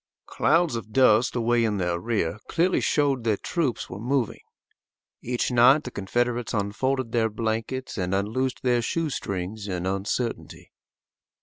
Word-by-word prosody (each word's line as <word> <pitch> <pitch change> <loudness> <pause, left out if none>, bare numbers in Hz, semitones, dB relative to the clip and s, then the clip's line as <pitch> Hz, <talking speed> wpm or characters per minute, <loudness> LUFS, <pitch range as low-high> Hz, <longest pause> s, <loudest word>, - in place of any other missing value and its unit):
Clouds 165 -3 +2
of 110 -1 -6
dust 120 -2 +4
away 120 0 +2
in 105 -2 0
their 90 -2 -1
rear 100 -4 -1
clearly 180 +2 +1
showed 140 -5 +1
that 110 -3 0
troops 155 -9 -1
were 100 - -8
moving. 125 0 -1 0.8
Each 125 +1 -1
night 125 +5 +6
the 125 - -7
Confederates 120 +4 -1
unfolded 115 +5 -1
their 115 -2 +2
blankets 115 +3 -3
and 90 +1 0
unloosed 115 +7 -1
their 125 -2 +2
shoe 160 +5 -1
strings 100 0 -4
in 90 -2 -3
uncertainty. 100 +5 -3
115 Hz, 140 wpm, -25 LUFS, 105-130 Hz, 0.8 s, night